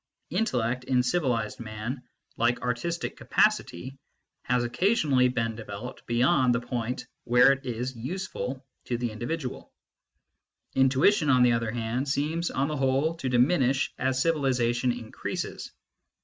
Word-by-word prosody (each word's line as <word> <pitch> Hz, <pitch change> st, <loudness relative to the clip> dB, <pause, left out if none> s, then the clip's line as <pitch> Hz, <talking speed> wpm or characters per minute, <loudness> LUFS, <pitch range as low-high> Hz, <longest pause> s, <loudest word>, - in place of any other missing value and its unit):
Intellect, 125 Hz, -, 0 dB
in 125 Hz, -1 st, +2 dB
civilised 125 Hz, -7 st, 0 dB
man, 115 Hz, +3 st, -5 dB, 0.3 s
like 120 Hz, +1 st, +1 dB
artistic 125 Hz, +8 st, -2 dB
capacity, 130 Hz, +10 st, 0 dB, 0.5 s
has 125 Hz, -1 st, +1 dB
occasionally 140 Hz, -, +2 dB
been 115 Hz, -2 st, -1 dB
developed 110 Hz, +2 st, -8 dB
beyond 125 Hz, +1 st, +3 dB
the -, -, +1 dB
point 125 Hz, 0 st, -4 dB, 0.2 s
where 125 Hz, +2 st, +6 dB
it 135 Hz, 0 st, -2 dB
is 125 Hz, +2 st, -3 dB
useful 135 Hz, -1 st, -5 dB, 0.2 s
to 120 Hz, -, -1 dB
the 120 Hz, -1 st, -2 dB
individual; 125 Hz, +5 st, -5 dB, 1.0 s
intuition, 140 Hz, +6 st, +3 dB
on 125 Hz, -2 st, +5 dB
the 125 Hz, -, +5 dB
other 115 Hz, -1 st, 0 dB
hand, 120 Hz, +4 st, -2 dB
seems 155 Hz, +5 st, 0 dB
on 135 Hz, +1 st, 0 dB
the 150 Hz, 0 st, -3 dB
whole 135 Hz, +4 st, +1 dB
to 135 Hz, -5 st, -3 dB
diminish 130 Hz, +1 st, +2 dB
as 130 Hz, 0 st, 0 dB
civilisation 130 Hz, -5 st, +1 dB
increases. 120 Hz, -2 st, -5 dB
125 Hz, 130 wpm, -27 LUFS, 120-140 Hz, 1.0 s, where